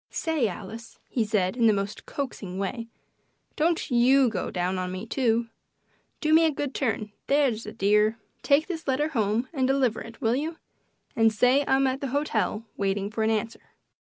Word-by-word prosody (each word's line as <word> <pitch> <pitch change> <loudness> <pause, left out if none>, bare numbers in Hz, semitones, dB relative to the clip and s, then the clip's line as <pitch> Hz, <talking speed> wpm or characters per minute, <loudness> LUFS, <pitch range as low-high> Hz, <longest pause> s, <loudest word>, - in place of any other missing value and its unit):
"Say, 315 -8 0
Alice," 215 +4 -8
he 235 - 0
said, 205 -3 0
in 235 -2 +3
the 215 - +5
most 200 +2 -4
coaxing 210 -9 -5
way, 225 +4 -3 0.7
"don't 325 -2 0
YOU 250 +1 +5
get - - -3
down 185 +1 -1
on 180 0 -3
me, 185 +3 -5
too. 230 -2 0 0.7
Do 310 0 +2
me 325 +1 +7
a 320 - +3
good 285 -1 -4
turn 220 -5 -2 0.2
that's 270 -7 +1
a - - -5
dear. 210 +3 +2 0.2
Take 290 +2 +3
this 330 -5 -6
letter 285 +3 +1
home 225 -2 0
and 260 -4 +1
deliver 265 -4 +1
it. 230 0 -10
Will 230 -2 +1
you? 315 +5 -2 0.6
And 225 -1 +4
say 250 +6 +3
I'm 270 0 +3
at 265 +1 -1
the 280 - -2
hotel 265 -5 -1
waiting 200 0 -1
for 220 - -3
an 220 - +2
answer." 225 +1 -2
230 Hz, 185 wpm, -26 LUFS, 210-275 Hz, 0.7 s, me